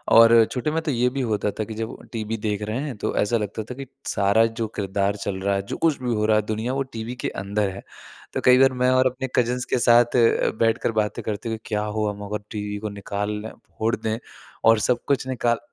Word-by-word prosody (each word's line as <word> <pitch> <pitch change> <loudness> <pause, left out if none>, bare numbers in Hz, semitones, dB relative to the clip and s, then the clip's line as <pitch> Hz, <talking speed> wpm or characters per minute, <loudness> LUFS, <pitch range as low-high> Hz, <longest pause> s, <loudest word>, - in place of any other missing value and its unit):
और 115 0 +8
छोटे 130 +4 -1
में 160 +1 0
तो 155 - -1
ये 125 -1 +2
भी 135 +2 -3
होता 105 -4 0
था - - +1
कि 110 - -7
जब 110 +1 -4 0.2
टीवी 110 -1 -3
देख 105 -1 -2
रहे 110 +3 -2
हैं 145 -4 -4
तो - - -2
ऐसा 110 +3 +2
लगता 105 0 -4
था 125 - -5
कि 135 +1 -7 0.2
सारा 100 +2 +3
जो 115 - 0
किरदार 100 0 0
चल 100 -2 -3
रहा 100 +1 +1
है 100 - 0
जो - - -2
कुछ 160 -3 +2
भी 125 -2 0
हो 105 0 +1
रहा 110 0 +4
है - - +3
दुनिया 110 +4 -2
वो 135 0 0
टीवी 115 +2 -5
के - - -1
अंदर 100 +1 -1
है। 95 +1 -8 0.5
तो - - -1
कई 125 0 +7
बार 135 0 +5
मैं 125 - +4
और 130 0 +4
अपने 130 +1 -3
कज़िन्स 125 +1 +1
के - - 0
साथ 120 0 +5
अ, 115 -2 +4
बैठकर 115 0 +2
बातें 110 -1 -1
करते 110 +2 -3
हुए, 110 - -2
क्या 105 -1 -1
हो 105 0 -1
हम 105 0 -6
अगर 105 +1 -4
टीवी 105 -1 -4
को 105 +1 -4
निकाल 100 0 -4
लें, 110 - -6 0.3
फ़ोड़ 110 +1 +1
दें 110 0 -2 0.5
और 115 -1 +6
सब 120 +2 +1
कुछ 140 -2 +1
निकाल 120 -2 0
110 Hz, 250 wpm, -24 LUFS, 105-125 Hz, 0.5 s, और